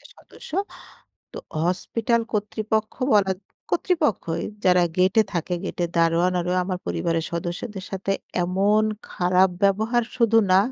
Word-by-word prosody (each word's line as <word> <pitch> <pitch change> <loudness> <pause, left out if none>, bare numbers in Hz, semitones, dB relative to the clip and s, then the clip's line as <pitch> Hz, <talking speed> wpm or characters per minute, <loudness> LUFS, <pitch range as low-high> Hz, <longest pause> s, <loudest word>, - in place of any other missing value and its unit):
সদস্য - - -14 0.8
তো - - -7 0.3
হসপিটাল 230 +6 0
কর্তৃপক্ষ 215 +1 -1 0.2
বলা 200 -2 +4 0.4
কর্তৃপক্ষই 300 - 0 0.2
যারা 180 -1 +5
গেটে 185 +4 +4
থাকে 175 0 -1
গেটে 175 - -2
দারোয়ান 170 +2 +3
আরও 180 +1 -2
আমার 180 0 -3
পরিবারের 165 -2 -1
সদস্যদের 180 +4 -4
সাথে 195 0 -2 0.3
এমন 195 +4 +2 0.3
খারাপ 180 +1 +3
ব্যবহার 220 +5 +2
শুধু 230 -2 +3 0.2
না। 185 - +7
190 Hz, 120 wpm, -24 LUFS, 180-215 Hz, 0.8 s, না